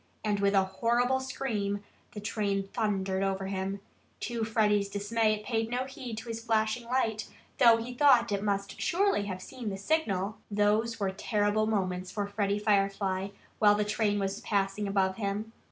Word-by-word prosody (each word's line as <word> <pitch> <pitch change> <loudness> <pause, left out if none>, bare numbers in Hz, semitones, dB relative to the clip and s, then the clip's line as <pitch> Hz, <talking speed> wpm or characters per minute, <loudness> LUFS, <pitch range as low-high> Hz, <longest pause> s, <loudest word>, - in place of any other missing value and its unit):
And 210 -2 0
with 200 0 +2
a 195 - +5
horrible 240 +7 +1
scream 210 -6 -2 0.3
the 210 - -6
train 200 -2 -1
thundered 195 -4 0
over 195 0 -1
him. 195 +1 -3 0.4
To 235 -2 -2
Freddie's 210 -2 +2
dismay 215 +2 +1
it 210 0 -10
paid 225 -2 -1
no 250 +2 -1
heed 255 -4 -7
to 225 - -7
his 230 0 -5
flashing 225 +1 +1
light, 225 -4 0 0.3
though 235 -3 +7
he 235 +2 -5
thought 245 -4 +5
it 200 -1 0
must 200 -1 -2
surely 375 - +2
have 185 -2 -5
seen 250 -5 -6
that 195 - -4
signal. 200 - 0
Those 215 +2 +1
were 195 -2 0
terrible 205 +2 +1
moments 185 -4 -1
for 205 +1 -2
Freddie 200 0 0
Firefly, 195 -2 +1 0.3
while 205 -1 +6
the 210 0 0
train 210 0 +1
was 195 +1 -2
passing 200 0 0
above 190 -1 +1
him. 210 +1 -3
210 Hz, 170 wpm, -30 LUFS, 200-225 Hz, 0.4 s, though